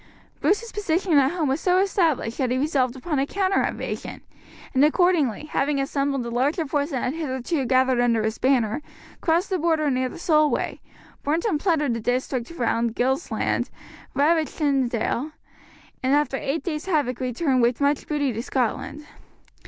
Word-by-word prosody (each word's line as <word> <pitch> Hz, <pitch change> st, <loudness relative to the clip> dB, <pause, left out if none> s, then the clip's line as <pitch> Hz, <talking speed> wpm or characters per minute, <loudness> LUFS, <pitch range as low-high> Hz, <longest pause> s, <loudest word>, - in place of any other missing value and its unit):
Bruce's 450 Hz, +3 st, +1 dB
position 370 Hz, -3 st, 0 dB
at 270 Hz, -1 st, +3 dB
home 340 Hz, -4 st, -1 dB
was 270 Hz, +4 st, 0 dB
so 365 Hz, 0 st, +3 dB
established 335 Hz, -, +1 dB
that 260 Hz, -3 st, +1 dB
he 250 Hz, -, 0 dB
resolved 265 Hz, -3 st, +1 dB
upon 290 Hz, +2 st, -2 dB
a 275 Hz, -, 0 dB
counter 390 Hz, +2 st, +1 dB
invasion, -, -, -4 dB, 0.5 s
and 265 Hz, +1 st, +4 dB
accordingly, 305 Hz, -, +2 dB
having 285 Hz, -1 st, 0 dB
assembled 275 Hz, -2 st, -1 dB
a 235 Hz, -, -5 dB
larger 285 Hz, +7 st, 0 dB
force 290 Hz, 0 st, -1 dB
than 260 Hz, -6 st, -2 dB
had 255 Hz, -, -1 dB
hitherto 280 Hz, -1 st, -2 dB
gathered 255 Hz, 0 st, +3 dB
under 230 Hz, -2 st, +2 dB
his 220 Hz, +1 st, -2 dB
banner, 255 Hz, -1 st, +2 dB, 0.4 s
crossed 345 Hz, +4 st, +1 dB
the 375 Hz, -, +1 dB
Border 315 Hz, -3 st, +1 dB
near 255 Hz, 0 st, 0 dB
the -, -, -10 dB
Solway, 305 Hz, -3 st, +1 dB, 0.4 s
burnt 315 Hz, +6 st, 0 dB
and 360 Hz, -10 st, +1 dB
plundered 300 Hz, -7 st, +1 dB
the 230 Hz, -, -2 dB
district 245 Hz, +1 st, -1 dB
round 235 Hz, -7 st, -1 dB
Gilsland, 265 Hz, +6 st, 0 dB, 0.5 s
ravaged 310 Hz, +2 st, +2 dB
Tynedale, 275 Hz, -1 st, 0 dB, 0.7 s
and 265 Hz, +2 st, +2 dB
after 295 Hz, -2 st, +1 dB
eight 285 Hz, +5 st, -2 dB
days' 315 Hz, -1 st, -4 dB
havock 285 Hz, -9 st, 0 dB
returned 255 Hz, +1 st, 0 dB
with 235 Hz, 0 st, +2 dB
much 285 Hz, 0 st, +1 dB
booty 290 Hz, -4 st, 0 dB
to 225 Hz, -, -3 dB
Scotland. 260 Hz, +4 st, -2 dB
280 Hz, 165 wpm, -24 LUFS, 255-320 Hz, 0.7 s, and